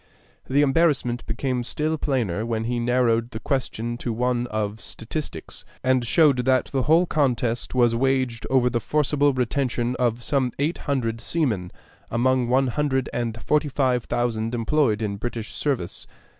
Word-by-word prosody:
The 140 Hz, +3 st, +4 dB
embarrassment 135 Hz, -5 st, +2 dB
became 125 Hz, +2 st, -1 dB
still 155 Hz, +6 st, -1 dB
plainer 120 Hz, -, -1 dB
when 115 Hz, -1 st, -2 dB
he 120 Hz, +1 st, -1 dB
narrowed 120 Hz, -1 st, +2 dB
the 110 Hz, -, -6 dB
question 120 Hz, -3 st, -2 dB
to 120 Hz, -, -3 dB
one 120 Hz, +1 st, 0 dB
of 110 Hz, -1 st, -3 dB
statistics, 115 Hz, -, -6 dB, 0.2 s
and 130 Hz, -1 st, +2 dB
showed 145 Hz, +3 st, +4 dB
that 130 Hz, +1 st, +2 dB
the 135 Hz, -, +1 dB
whole 160 Hz, +6 st, +4 dB
contest 125 Hz, -7 st, 0 dB
was 120 Hz, -2 st, +4 dB
waged 130 Hz, -1 st, 0 dB
over 130 Hz, -2 st, +3 dB
the 120 Hz, -1 st, 0 dB
forcible 145 Hz, +3 st, +2 dB
retention 125 Hz, -1 st, -1 dB
of 120 Hz, -1 st, 0 dB
some 130 Hz, -3 st, 0 dB
eight 150 Hz, +5 st, -1 dB
hundred 115 Hz, -5 st, -1 dB
seamen 115 Hz, -, -1 dB, 0.4 s
among 125 Hz, +1 st, +2 dB
one 130 Hz, +2 st, +3 dB
hundred 135 Hz, -1 st, 0 dB
and 115 Hz, -1 st, -3 dB
forty 150 Hz, 0 st, +1 dB
five 130 Hz, -3 st, +1 dB
thousand 120 Hz, -1 st, -1 dB
employed 115 Hz, -2 st, +1 dB
in 100 Hz, -2 st, -2 dB
British 115 Hz, 0 st, -5 dB
service. 130 Hz, -12 st, -2 dB
125 Hz, 155 wpm, -24 LUFS, 115-135 Hz, 0.4 s, The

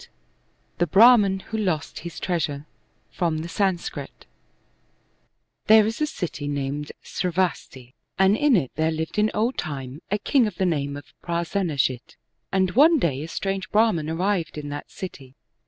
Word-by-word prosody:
TAe 175 Hz, -, +2 dB
Brdhman 200 Hz, 0 st, +6 dB
Who 220 Hz, -, -4 dB
Lost 180 Hz, -7 st, -2 dB
His 170 Hz, -1 st, -8 dB
Treasure 150 Hz, -5 st, -2 dB, 0.5 s
From 165 Hz, -3 st, -1 dB
the -, -, -5 dB
Sanskrit 185 Hz, 0 st, -3 dB, 1.4 s
'pHERE 220 Hz, -1 st, +7 dB
is 225 Hz, +6 st, -3 dB
a 305 Hz, -, +2 dB
city 165 Hz, -, -5 dB
named 145 Hz, +1 st, -3 dB
^ravasti, 170 Hz, -8 st, -2 dB, 0.2 s
and 195 Hz, +1 st, +4 dB
in 290 Hz, +1 st, +3 dB
it 145 Hz, -, 0 dB
there 160 Hz, +1 st, +1 dB
lived 160 Hz, +5 st, -3 dB
in 210 Hz, +1 st, +3 dB
old 230 Hz, +5 st, 0 dB
time 140 Hz, -2 st, -5 dB
a 205 Hz, -, +1 dB
king 245 Hz, +2 st, +2 dB
of 205 Hz, -, -6 dB
the 190 Hz, -, 0 dB
name 145 Hz, -5 st, -1 dB
of 145 Hz, -, -13 dB
Prasenajit, 170 Hz, -, -1 dB, 0.4 s
and 190 Hz, -1 st, +2 dB
one 310 Hz, -, +6 dB
day 145 Hz, -, 0 dB
a 155 Hz, -, -5 dB
strange 195 Hz, +3 st, -3 dB
Brahman 210 Hz, -8 st, +2 dB
arrived 175 Hz, -1 st, -1 dB
in 145 Hz, -1 st, -5 dB
that 145 Hz, 0 st, -6 dB
city. 135 Hz, -8 st, -9 dB
175 Hz, 155 wpm, -24 LUFS, 150-205 Hz, 1.4 s, pHERE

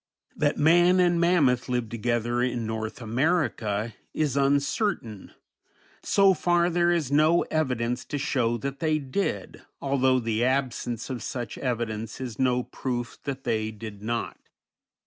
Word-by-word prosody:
That -, -, +1 dB
man 175 Hz, +4 st, +5 dB
and 175 Hz, -1 st, +3 dB
mammoth 145 Hz, -9 st, +3 dB
lived 120 Hz, -3 st, -1 dB
together 120 Hz, +1 st, 0 dB
in 125 Hz, -2 st, -1 dB
North 110 Hz, +2 st, -4 dB
America 115 Hz, -, 0 dB, 0.2 s
is 150 Hz, -4 st, 0 dB
uncertain; 140 Hz, -, 0 dB, 0.7 s
so 195 Hz, -1 st, +4 dB
far 175 Hz, 0 st, +2 dB
there 175 Hz, 0 st, +2 dB
is 165 Hz, -6 st, 0 dB
no 155 Hz, +4 st, +4 dB
evidence 125 Hz, -6 st, 0 dB
to 145 Hz, -, -4 dB
show 125 Hz, -5 st, 0 dB
that 140 Hz, +3 st, -5 dB
they 155 Hz, -1 st, +1 dB
did, 135 Hz, -, -3 dB, 0.2 s
although 130 Hz, -2 st, +2 dB
the 115 Hz, -1 st, -1 dB
absence 125 Hz, -2 st, -1 dB
of 125 Hz, -, -4 dB
such 120 Hz, -4 st, -5 dB
evidence 115 Hz, -4 st, -3 dB
is 125 Hz, -5 st, -6 dB
no 125 Hz, -1 st, +2 dB
proof 120 Hz, -2 st, -4 dB
that 135 Hz, -1 st, -4 dB
they 110 Hz, -1 st, 0 dB
did 105 Hz, -2 st, -9 dB
not. 115 Hz, +2 st, -3 dB
130 Hz, 140 wpm, -26 LUFS, 115-155 Hz, 0.7 s, man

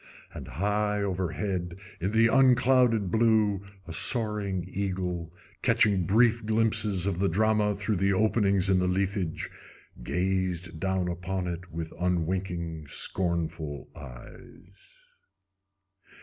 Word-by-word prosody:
And -, -, -8 dB
high 105 Hz, +6 st, -1 dB
overhead, 90 Hz, -1 st, -3 dB, 0.2 s
in 95 Hz, -, -1 dB
the 115 Hz, +1 st, +4 dB
unclouded 125 Hz, -4 st, +4 dB
blue, 110 Hz, -3 st, +3 dB, 0.3 s
a 80 Hz, -, -6 dB
soaring 100 Hz, 0 st, +1 dB
eagle, 90 Hz, -4 st, -3 dB, 0.3 s
catching 95 Hz, -5 st, +3 dB
brief 115 Hz, +2 st, +3 dB
glimpses 110 Hz, -3 st, +1 dB
of 95 Hz, -3 st, -1 dB
the 100 Hz, -, +2 dB
drama 105 Hz, +2 st, +2 dB
through 105 Hz, +1 st, -1 dB
the 95 Hz, +2 st, +2 dB
openings 100 Hz, -1 st, +2 dB
in 95 Hz, -1 st, +3 dB
the 90 Hz, -, +1 dB
leafage, 95 Hz, -2 st, -2 dB, 0.5 s
gazed 90 Hz, +1 st, -2 dB
down 95 Hz, 0 st, -1 dB
upon 90 Hz, +1 st, -3 dB
it 90 Hz, 0 st, -6 dB
with 80 Hz, 0 st, -5 dB
unwinking, 85 Hz, -2 st, -2 dB
scornful 80 Hz, -4 st, -2 dB
eyes. 70 Hz, -, -13 dB
95 Hz, 110 wpm, -28 LUFS, 90-105 Hz, 0.5 s, the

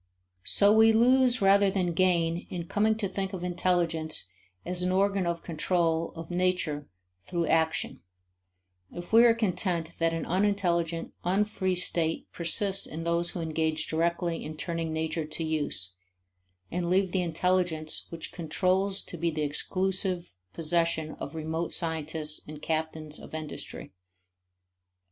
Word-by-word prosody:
So 205 Hz, +1 st, +6 dB
we 220 Hz, 0 st, +6 dB
lose 250 Hz, 0 st, +4 dB
rather 200 Hz, +1 st, +5 dB
than 185 Hz, -3 st, 0 dB
gain 170 Hz, -1 st, +1 dB
in 175 Hz, -2 st, -4 dB
coming 215 Hz, +5 st, +2 dB
to 215 Hz, -2 st, -2 dB
think 195 Hz, +1 st, -3 dB
of 180 Hz, -2 st, -5 dB
intelligence 170 Hz, -, 0 dB, 0.4 s
as 180 Hz, 0 st, -2 dB
an 180 Hz, 0 st, +1 dB
organ 195 Hz, -1 st, +2 dB
of 170 Hz, -1 st, -2 dB
control 165 Hz, 0 st, 0 dB
of 165 Hz, +1 st, -8 dB
nature 175 Hz, -5 st, 0 dB, 0.4 s
through 170 Hz, -2 st, -1 dB
action, 160 Hz, -4 st, +1 dB, 0.9 s
if 175 Hz, +4 st, -9 dB
we 230 Hz, +1 st, +8 dB
are 230 Hz, -1 st, +6 dB
content 180 Hz, -6 st, 0 dB
that 165 Hz, 0 st, +2 dB
an 165 Hz, -1 st, -3 dB
unintelligent, 175 Hz, -3 st, 0 dB
unfree 190 Hz, 0 st, +1 dB
state 170 Hz, -2 st, 0 dB
persists 190 Hz, +4 st, +1 dB
in 160 Hz, +2 st, -6 dB
those 170 Hz, +1 st, 0 dB
who 175 Hz, -, -5 dB
engage 160 Hz, -1 st, 0 dB
directly 170 Hz, +1 st, -1 dB
in 155 Hz, 0 st, -7 dB
turning 165 Hz, -1 st, -3 dB
nature 160 Hz, 0 st, -2 dB
to 165 Hz, -, -4 dB
use, 150 Hz, -12 st, -1 dB, 0.8 s
and 175 Hz, 0 st, -1 dB
leave 190 Hz, 0 st, +2 dB
the 185 Hz, -, +1 dB
intelligence 175 Hz, -2 st, 0 dB
which 165 Hz, -1 st, -6 dB
controls 185 Hz, +4 st, 0 dB
to 175 Hz, -, -8 dB
be 170 Hz, +1 st, 0 dB
the 155 Hz, -1 st, -2 dB
exclusive 185 Hz, -, -1 dB, 0.2 s
possession 165 Hz, -, 0 dB
of 150 Hz, -, -6 dB
remote 160 Hz, +1 st, -3 dB
scientists 155 Hz, -2 st, 0 dB
and 150 Hz, 0 st, -9 dB
captains 155 Hz, -1 st, -3 dB
of -, -, -9 dB
industry. 155 Hz, -2 st, -6 dB
170 Hz, 140 wpm, -28 LUFS, 160-185 Hz, 0.9 s, we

